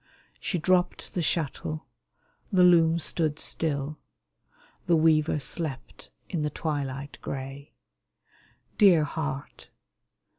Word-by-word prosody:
She 185 - -1
dropped 180 +2 +1
the 180 - -1
shuttle; 155 -1 -1 0.7
the 185 -2 +5
loom 165 -2 +6
stood 155 -2 0
still; 150 -2 -2 0.9
The 170 - +5
weaver 155 -1 +3
slept 145 -2 -5 0.2
in 170 - -2
the 150 - 0
twilight 140 -3 -4
gray. 135 +1 -6 1.1
Dear 180 -7 +7
heart 150 -1 -5
155 Hz, 100 wpm, -27 LUFS, 145-170 Hz, 1.1 s, Dear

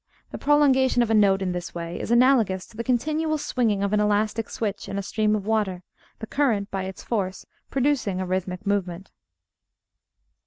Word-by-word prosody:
The - - -6
prolongation 265 -4 +4
of 225 - -2
a - - +3
note 195 -2 +4
in 185 - -1
this 175 0 -5
way 170 0 -5
is - - -5
analogous 235 -6 +3
to - - -19
the 235 - -4
continual 310 +6 0
swinging 225 -8 0
of 200 +1 -1
an 210 - +3
elastic 210 +1 0
switch 210 -3 -4
in 195 - -4
a 200 - -2
stream 215 +1 +1
of 205 -2 -4
water, 205 -5 -1 0.3
the 220 - -6
current 220 -6 0
by 190 -1 -3
its 190 -2 -8
force 195 -5 -3 0.2
producing 260 -8 0
a 185 - -2
rhythmic 185 +1 -3
movement. 190 -2 -2
210 Hz, 185 wpm, -24 LUFS, 190-245 Hz, 0.3 s, prolongation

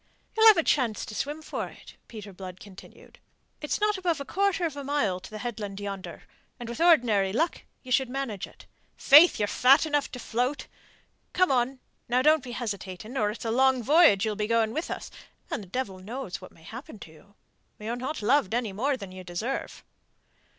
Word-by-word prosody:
"You 445 - -1
shall 450 - +9
have 425 - +6
a 330 - +3
chance 245 -9 +1
to - - -9
swim 295 +7 -4
for - - -4
it," - - -14
Peter 210 -3 -10
Blood 185 0 -9
continued. 195 -2 -15 0.4
"It's 300 - -2
not 420 -1 +1
above 345 -5 0
a 280 - -5
quarter 390 +1 0
of 315 -4 -3
a 285 - -6
mile 265 -10 0
to - - -12
the 215 - -7
headland 210 -4 -5
yonder, 200 -2 -7 0.4
and 240 - -7
with 235 +7 -5
ordinary 235 - +4
luck 320 - 0 0.2
ye 255 - -10
should 260 0 +2
manage 250 -7 -4
it. - - -18 0.3
Faith, 305 +5 +7
you're 205 - 0
fat 270 +8 +5
enough 295 -2 -1
to - - -5
float. 250 +4 -2 0.7
Come 365 -3 +3
on! 255 +1 0 0.3
Now, 250 +1 +2
don't 305 -1 +4
be 245 -2 -7
hesitating 215 -1 -6
or 210 -5 +1
it's 215 +2 -7
a 225 - 0
long 260 +1 +3
voyage 290 - +5
ye'll 215 -1 -1
be 210 0 -2
going 225 -1 +1
with 315 +3 -3
us, - - -6 0.4
and - - -2
the 195 - -11
devil 195 -2 -4
knows 210 0 -6
what 185 - -11
may 160 - -20
happen 220 - -10
to 165 - -12
you. 195 +6 -20 0.4
You're 220 +3 -4
not 255 0 -5
loved 230 -2 +2
any 235 -5 -2
more 265 +7 0
than 200 -5 -9
you 185 0 -9
deserve." 200 +10 -4
240 Hz, 205 wpm, -27 LUFS, 205-285 Hz, 0.7 s, shall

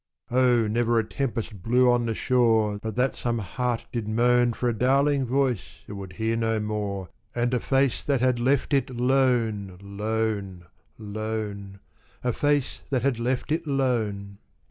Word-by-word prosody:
Oh! 125 -2 +4
never 120 +2 +1
a 115 - +3
tempest 115 -4 -4
blew 125 +5 +3
on 120 -1 +1
the 115 - -1
shore 110 -5 +2
But 110 -2 -4
that 130 +2 +1
some 120 -1 -2
heart 120 +3 -2
did 115 -3 -3
moan 120 +2 +3
For 125 - -2
a 120 - +2
darling 135 +3 +2
voice 130 -5 -1
it - - -8
would 95 -2 -8
hear 110 +4 -1
no 115 -1 0
more 105 -3 -3 0.3
And 120 +1 0
a 125 - +2
face 135 0 +1
that 140 -3 +1
had 125 -1 +2
left 135 +4 +1
it 135 -2 +2
lone, 120 -6 +1
lone, 100 -2 -3 0.3
lone 105 -2 -5 0.4
A 125 -1 +1
face 145 0 0
that 130 -4 0
had 135 -4 +1
left 125 +4 -1
it 165 +1 -1
lone! 110 -8 -1
115 Hz, 165 wpm, -26 LUFS, 105-125 Hz, 0.4 s, Oh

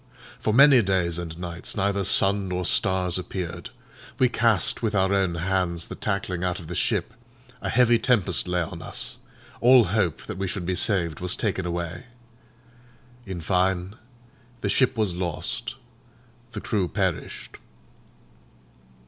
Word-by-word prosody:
For 110 - 0
many 135 +2 +7
days 90 -4 0
and 85 -2 -6
nights 85 +1 -5
neither 100 0 0
sun 100 +1 +3
nor 90 0 -2
stars 95 -2 +2
appeared; 90 -2 -6 0.5
we 130 - +3
cast 115 -6 +2
with 110 -2 -1
our 95 0 +2
own 95 -3 +1
hands 85 -1 -1
the - - -6
tackling 100 -3 -3
out 90 -1 -1
of 85 - -9
the 85 - -6
ship; 110 - 0 0.5
a - - -3
heavy 120 -2 +4
tempest 100 -9 +2
lay 90 -1 0
on 85 +1 -8
us; - - -5 0.4
all 125 0 +7
hope 95 -5 -1
that - - -7
we 95 - -1
should 95 -1 -4
be 90 - -1
saved 90 -4 +1
was 90 +1 +1
taken 95 -4 -2
away. 85 +6 -4 1.2
In 95 -3 -5
fine, 90 +2 0 0.7
the 100 - -1
ship 125 +3 +2
was 105 -5 0
lost, 90 -3 -3 0.8
the - - -5
crew 100 -4 -1
perished. 95 -3 -3
95 Hz, 150 wpm, -25 LUFS, 85-105 Hz, 1.2 s, many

